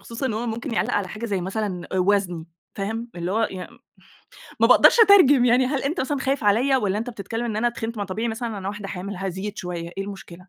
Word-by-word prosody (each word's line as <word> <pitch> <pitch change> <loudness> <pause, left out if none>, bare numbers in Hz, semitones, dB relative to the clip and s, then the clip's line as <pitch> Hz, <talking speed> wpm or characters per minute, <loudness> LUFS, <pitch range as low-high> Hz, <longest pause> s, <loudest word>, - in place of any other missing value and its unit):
خصوصًا 235 +3 -5
إنه 220 - -2
هو 235 +2 -3
ممكن 230 +2 -4
يعلّق - - 0
على 200 -2 0
حاجة 215 +5 -7
زي 195 -4 -1
مثلًا 190 -1 -4
أ 190 - 0
وزني، 180 -4 +1 0.3
فاهم؟ 225 +4 -4
اللي 175 +2 -3
هو 225 +1 +1
ي 190 - -7 1.0
ما - - +6
باقدرش - - +6
أترجم 360 - +7
يعني 250 +1 +4
هل 270 0 -1
أنت 285 +4 -1
مثلًا 275 +1 -1
خايف 270 -3 -1
عليَّ، 245 +7 +3
والَّا 205 -3 0
أنت 240 +3 -4
بتتكلم 225 +2 -5
إن 220 -3 -3
أنا 240 +2 +2
تخِنت؟ 230 -1 -5
ما 205 - -1
طبيعي 220 +5 -3
مثلًا 230 +1 -3
إن 220 - -5
أنا 195 -1 -5
واحدة 205 -1 -6
حامل، 195 +2 -6
هازيد 195 +2 -4
شويّة، 170 -1 -5
إيه 195 - -2
المشكلة؟ 185 -2 -10
215 Hz, 235 wpm, -23 LUFS, 195-240 Hz, 1.0 s, أترجم